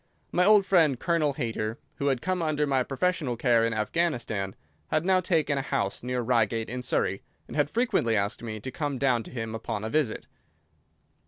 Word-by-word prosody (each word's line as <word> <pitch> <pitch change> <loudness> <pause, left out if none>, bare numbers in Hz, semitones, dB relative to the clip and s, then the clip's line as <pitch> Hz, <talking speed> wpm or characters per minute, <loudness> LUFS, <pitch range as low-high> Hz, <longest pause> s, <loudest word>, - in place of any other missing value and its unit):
My 180 - +3
old 205 -1 +6
friend, 160 -10 +3
Colonel 165 -3 +1
Hayter, 115 -3 -3 0.2
who 140 - -1
had 135 -3 0
come 185 0 0
under 155 -2 +1
my 135 -2 +2
professional 140 -1 -1
care 120 -2 +3
in 115 - +1
Afghanistan, 110 - -1 0.3
had 155 +2 0
now 190 -1 +4
taken 155 -6 +1
a - - 0
house 100 -7 -2
near 125 0 -2
Reigate 115 -2 +1
in 125 0 -3
Surrey, 95 -5 0 0.3
and - - -9
had 145 -1 +2
frequently 185 - +1
asked 100 +1 -1
me 110 -2 -5
to 130 - -5
come 145 0 -2
down 125 -3 +2
to - - -10
him 115 -3 -4
upon 110 -2 -4
a 110 - -3
visit. 150 -8 0
130 Hz, 190 wpm, -27 LUFS, 115-155 Hz, 0.3 s, old